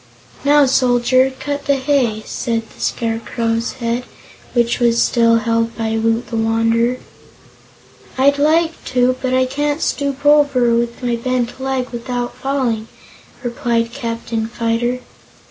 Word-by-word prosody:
"Now, 290 Hz, 0 st, +5 dB
Soldier, 255 Hz, 0 st, +3 dB
cut 285 Hz, 0 st, -4 dB
the 280 Hz, -, +4 dB
hay," 260 Hz, -5 st, 0 dB
said 230 Hz, -1 st, -2 dB
the -, -, -15 dB
Scarecrow's 230 Hz, 0 st, -1 dB
head, 240 Hz, -1 st, -2 dB, 0.5 s
which 235 Hz, -1 st, +1 dB
was 235 Hz, -1 st, +3 dB
still 230 Hz, -1 st, +3 dB
held 230 Hz, 0 st, 0 dB
by 225 Hz, -1 st, -1 dB
Woot 225 Hz, +1 st, +1 dB
the 230 Hz, -, -3 dB
Wanderer. 225 Hz, +2 st, +1 dB, 1.2 s
"I'd 280 Hz, +2 st, +3 dB
like 320 Hz, +3 st, +2 dB
to, 250 Hz, 0 st, +2 dB
but 255 Hz, -1 st, 0 dB
I 260 Hz, 0 st, +3 dB
can't 290 Hz, +3 st, -1 dB
stoop 280 Hz, -2 st, -2 dB
over, 285 Hz, -5 st, +4 dB
with 235 Hz, +2 st, -1 dB
my 240 Hz, -1 st, 0 dB
bent 250 Hz, +1 st, -2 dB
leg, 265 Hz, -1 st, -2 dB
without 245 Hz, 0 st, -4 dB
falling," 250 Hz, -5 st, -1 dB, 0.6 s
replied 235 Hz, -2 st, -1 dB
Captain 230 Hz, -3 st, -3 dB
Fyter. 235 Hz, +2 st, -1 dB
240 Hz, 130 wpm, -18 LUFS, 230-265 Hz, 1.2 s, Now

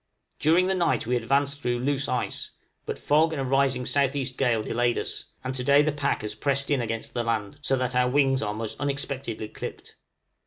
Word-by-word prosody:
During 165 Hz, +5 st, +4 dB
the 190 Hz, -, +1 dB
night 170 Hz, -12 st, +1 dB
we 125 Hz, +2 st, +1 dB
advanced 140 Hz, +4 st, +1 dB
through 120 Hz, -2 st, 0 dB
loose 140 Hz, +2 st, 0 dB
ice; 125 Hz, -, -2 dB, 0.3 s
but -, -, -3 dB
fog 155 Hz, +2 st, +3 dB
and 145 Hz, -, -2 dB
a -, -, -2 dB
rising 135 Hz, -1 st, +2 dB
S.E. 140 Hz, +1 st, +1 dB
gale 115 Hz, -5 st, +1 dB
delayed 120 Hz, +1 st, +1 dB
us, -, -, -3 dB, 0.2 s
and 130 Hz, -, -3 dB
to 130 Hz, -1 st, -3 dB
day 140 Hz, +3 st, +5 dB
the 155 Hz, -, +1 dB
pack 145 Hz, -5 st, -1 dB
has 105 Hz, -, -3 dB
pressed 135 Hz, 0 st, -1 dB
in 140 Hz, -3 st, +2 dB
against 115 Hz, -1 st, -4 dB
the 120 Hz, -, 0 dB
land, 110 Hz, -3 st, -2 dB
so 135 Hz, -2 st, +1 dB
that 130 Hz, -1 st, -1 dB
our 125 Hz, 0 st, +3 dB
wings 135 Hz, 0 st, +3 dB
are 105 Hz, -1 st, -2 dB
most 110 Hz, -1 st, -5 dB
unexpectedly 140 Hz, -5 st, -3 dB
clipped. -, -, -8 dB
135 Hz, 205 wpm, -26 LUFS, 120-140 Hz, 0.3 s, day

